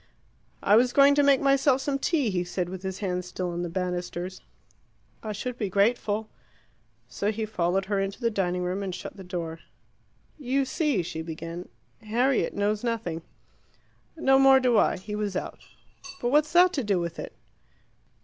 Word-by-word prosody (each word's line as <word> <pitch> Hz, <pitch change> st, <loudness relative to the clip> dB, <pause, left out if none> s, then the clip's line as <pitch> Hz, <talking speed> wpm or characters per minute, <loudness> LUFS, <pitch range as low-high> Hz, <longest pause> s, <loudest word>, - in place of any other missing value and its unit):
"I 205 Hz, -, +5 dB
was 245 Hz, +1 st, +3 dB
going 280 Hz, 0 st, +6 dB
to 290 Hz, -, +4 dB
make 280 Hz, -2 st, +4 dB
myself 275 Hz, -1 st, +3 dB
some 275 Hz, 0 st, -1 dB
tea," 280 Hz, -, +1 dB
he 180 Hz, -2 st, 0 dB
said, 180 Hz, 0 st, -3 dB
with 185 Hz, 0 st, -7 dB
his 190 Hz, -1 st, -4 dB
hand 180 Hz, -1 st, -1 dB
still 180 Hz, 0 st, -4 dB
on 170 Hz, 0 st, -3 dB
the 175 Hz, -, -3 dB
banisters. 180 Hz, 0 st, -4 dB, 0.8 s
"I 215 Hz, -, -5 dB
should 240 Hz, +4 st, -5 dB
be 205 Hz, -4 st, -1 dB
grateful 210 Hz, +2 st, +1 dB, 0.4 s
" -, -, -39 dB, 0.3 s
So 205 Hz, +1 st, -1 dB
he 220 Hz, 0 st, -3 dB
followed 190 Hz, -2 st, 0 dB
her 200 Hz, 0 st, -1 dB
into 195 Hz, 0 st, -3 dB
the 230 Hz, -2 st, 0 dB
dining 180 Hz, -3 st, -1 dB
room 180 Hz, +2 st, -2 dB
and 190 Hz, -3 st, -3 dB
shut -, -, -8 dB
the 195 Hz, -, -10 dB
door. 170 Hz, -3 st, -5 dB, 0.8 s
"You 270 Hz, 0 st, 0 dB
see," 280 Hz, -, 0 dB
she 160 Hz, -1 st, -5 dB
began, 165 Hz, +2 st, -7 dB, 0.3 s
"Harriet 240 Hz, +4 st, +1 dB
knows 205 Hz, +1 st, 0 dB
nothing." 210 Hz, -9 st, -2 dB, 1.0 s
"No 270 Hz, -4 st, +4 dB
more 270 Hz, 0 st, +7 dB
do 250 Hz, -2 st, +2 dB
I. -, -, +3 dB
He 200 Hz, +3 st, -8 dB
was 210 Hz, -2 st, -2 dB
out." -, -, -4 dB, 0.6 s
"But 240 Hz, -, -1 dB
what's 300 Hz, +3 st, +3 dB
that 360 Hz, +1 st, +6 dB
to 275 Hz, -, -1 dB
do 200 Hz, -4 st, +1 dB
with 170 Hz, -1 st, -4 dB
it?" -, -, -6 dB
205 Hz, 180 wpm, -26 LUFS, 180-255 Hz, 1.0 s, more